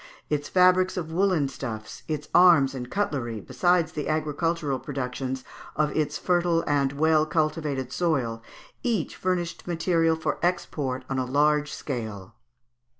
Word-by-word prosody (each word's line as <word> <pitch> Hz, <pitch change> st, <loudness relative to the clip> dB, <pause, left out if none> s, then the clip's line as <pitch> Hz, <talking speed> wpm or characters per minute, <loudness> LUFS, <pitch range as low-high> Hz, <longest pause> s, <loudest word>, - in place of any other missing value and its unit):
Its 145 Hz, -1 st, -1 dB
fabrics 185 Hz, 0 st, +4 dB
of 160 Hz, -3 st, -4 dB
woollen 180 Hz, -4 st, +2 dB
stuffs, 110 Hz, -5 st, -7 dB
its 150 Hz, -1 st, -3 dB
arms 170 Hz, -7 st, +6 dB
and 125 Hz, -2 st, -6 dB
cutlery, 130 Hz, -, -2 dB
besides 165 Hz, -, +1 dB
the 150 Hz, -1 st, -4 dB
agricultural 155 Hz, -2 st, -1 dB
productions 130 Hz, -1 st, -4 dB, 0.3 s
of 150 Hz, -1 st, 0 dB
its 150 Hz, -1 st, 0 dB
fertile 175 Hz, -2 st, +1 dB
and 140 Hz, -2 st, +1 dB
well 155 Hz, +1 st, +3 dB
cultivated 155 Hz, -4 st, -1 dB
soil, 130 Hz, -10 st, 0 dB, 0.4 s
each 225 Hz, -10 st, -1 dB
furnished 175 Hz, -2 st, -2 dB
material 165 Hz, -1 st, +2 dB
for 160 Hz, -2 st, -2 dB
export 145 Hz, -7 st, -1 dB
on 135 Hz, -1 st, -2 dB
a 130 Hz, -, 0 dB
large 150 Hz, +3 st, +2 dB
scale. 110 Hz, -8 st, -5 dB
150 Hz, 135 wpm, -26 LUFS, 135-170 Hz, 0.4 s, arms